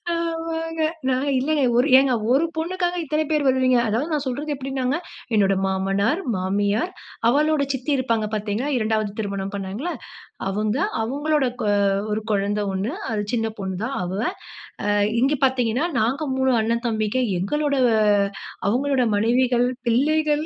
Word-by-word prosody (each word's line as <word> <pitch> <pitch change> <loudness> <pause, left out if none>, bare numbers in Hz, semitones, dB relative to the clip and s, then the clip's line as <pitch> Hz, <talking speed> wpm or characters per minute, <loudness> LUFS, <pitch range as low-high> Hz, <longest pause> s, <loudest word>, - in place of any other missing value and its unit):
ஆமாங்க. 325 -1 -3 0.3
நான் 260 +1 +1
இல்லயே, 295 +1 +1
ஒரு 250 +4 +4
ஏங்க 265 -1 +4 0.2
ஒரு 280 +5 +4
பொண்ணுக்காக 355 +2 -1
இத்தன 305 +1 0
பேர் 300 -2 +1
வருவீங்க. 255 -1 +3
அதாவது 260 +10 -1
நான் 295 -2 -1
சொல்றது 290 +4 -2
எப்படின்னாங்க. 265 0 -2 0.4
என்னோட 195 -2 +4
மாமனார், 195 - 0
மாமியார், 200 - 0 0.4
அவளோட 300 +3 +2
சித்தி 265 +3 -3
இருப்பாங்க 230 -4 0
பார்த்தீங்களா, 215 +6 -2
2ஆவது 215 -2 0
திருமணம் 200 -1 -3
பண்ணாங்களா? 200 - -4 0.6
அவங்க. 210 +4 -1 0.3
அவங்களோட 290 +3 0
கொ 210 - -1 0.5
ஒரு 215 +1 -2
குழந்தை 205 +1 0
ஒண்ணு 200 +8 -2 0.2
அது 210 -2 -1
சின்ன 225 -1 0
பொண்ணு 190 -2 -3
தான் 270 +3 -2
அவ. 180 +1 -4 0.7
அ, - - -1 0.3
இங்க 275 +3 +3
பார்த்தீங்கன்னா 255 +3 +1
நாங்க 270 +7 0
3 265 0 +2
அண்ணன் 235 +2 -1
தம்பிங்க 220 +2 0 0.2
எங்களோட 290 +9 0 0.9
அவங்களோட 260 +2 +1
மனைவிகள், 245 +2 +2 0.2
பிள்ளைகள். 300 +5 +2
255 Hz, 135 wpm, -23 LUFS, 215-295 Hz, 0.9 s, ஒரு